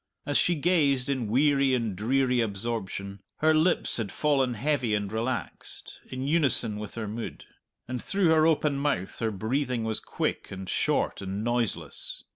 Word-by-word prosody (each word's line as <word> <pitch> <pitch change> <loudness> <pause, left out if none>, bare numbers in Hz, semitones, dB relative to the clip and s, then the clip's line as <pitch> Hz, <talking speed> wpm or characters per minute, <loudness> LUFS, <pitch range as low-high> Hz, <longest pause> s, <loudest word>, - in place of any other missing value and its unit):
As 145 - -2
she 175 - +4
gazed 145 -5 +2
in 130 -5 0
weary 135 +2 +3
and 115 -5 -1
dreary 125 +4 +2
absorption 100 -2 -3 0.2
her 155 +1 +4
lips 160 +3 +2
had 110 -4 -3
fallen 135 -5 +1
heavy 130 -3 +1
and 100 -1 -2
relaxed, 115 -2 -4
in 130 +1 -4
unison 135 -8 +2
with 105 -1 -7
her 115 -2 -3
mood; 110 +2 -6 0.4
and 125 0 -3
through 195 -3 +1
her 160 0 +5
open 150 -3 +2
mouth 140 -10 -1
her 115 - +1
breathing 120 +4 -1
was 110 -1 -1
quick, - - -3
and 95 -1 -7
short, - - 0
and 100 +2 -3
noiseless. 120 -2 -2
125 Hz, 160 wpm, -28 LUFS, 110-145 Hz, 0.4 s, her